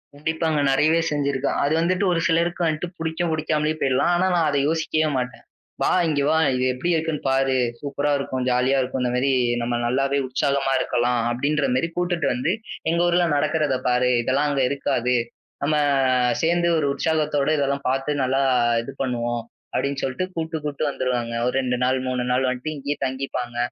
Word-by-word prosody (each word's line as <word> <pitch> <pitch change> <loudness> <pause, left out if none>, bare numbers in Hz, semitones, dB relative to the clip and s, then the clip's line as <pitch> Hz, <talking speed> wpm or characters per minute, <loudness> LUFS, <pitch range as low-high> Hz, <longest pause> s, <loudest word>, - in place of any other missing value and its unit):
கண்டிப்பாங்க. 160 +1 -1
நிறையவே 155 +4 +3
செஞ்சிருக்கோம். 140 -2 -1
அது 145 +2 +1
வந்துட்டு 185 +3 +1
ஒரு 165 - +1
சிலருக்கு 170 +1 +1
வந்துட்டு 160 +2 -1
புடிக்கும், 165 +1 -2
பிடிக்காமலும் 155 0 -1
போயிரலாம். 135 +5 +2
ஆனா 185 +2 +2
நான் 165 -3 +2
அதை 140 -1 +1
யோசிக்கவே 155 -1 0
மாட்டேன். 125 0 -4 0.4
வா - - +2 0.2
இங்க 145 -2 0
வா. 160 +1 +3 0.2
இது 125 - 0
எப்டி 130 +8 -3
இருக்குன்னு 160 -1 -2
பாரு. 135 0 +2 0.2
சூப்பரா 145 0 -2
இருக்கும். 130 -2 -3
ஜாலியா 125 +2 +2
இருக்கும். 130 +1 -3
அந்த 125 -1 0
மாரி 135 +2 +1 0.3
நம்ம 120 0 -1
நல்லாவே 135 +3 +1
உற்சாகமா 135 +1 0
இருக்கலாம் 120 0 0
அப்டின்ற 140 +4 0
மாதிரி 130 +6 +1
கூட்டிட்டு 175 -4 0
வந்து, 125 +7 0 0.4
எங்க 170 +1 +1
ஊர்ல 175 0 +3
நடக்கிறதை 150 -2 +1
பாரு. 125 0 +2
இதெல்லாம் 135 +5 +1
அங்க 140 -2 0
இருக்காது. 125 -3 0 0.5
நம்ம 150 +2 +1 0.7
சேர்ந்து 170 +1 +2
ஒரு 145 -3 +1
உற்சாகத்தோடு 150 -1 0
இதெல்லாம் 140 0 -1
பாத்து 135 +3 -1
நல்லா 135 +1 +1 0.4
இது 125 - -8
பண்ணுவோம் 120 -2 -1 0.3
அப்டின்னு 140 0 -1
சொல்லிட்டு 135 +7 -1
கூப்ட்டு, 160 -1 -3
கூப்ட்டு 150 0 -1
வந்துருவாங்க. 125 -4 -2
ஒரு 125 - -1
2 125 -1 -1
நாள், 130 +1 +2
3 125 -1 -1
நாள் 130 +1 +2
வந்துட்டு 130 +5 -3
இங்கேயே 145 +1 -3
தங்கிப்பாங்க. 130 -2 -4
140 Hz, 165 wpm, -23 LUFS, 130-155 Hz, 0.7 s, நிறையவே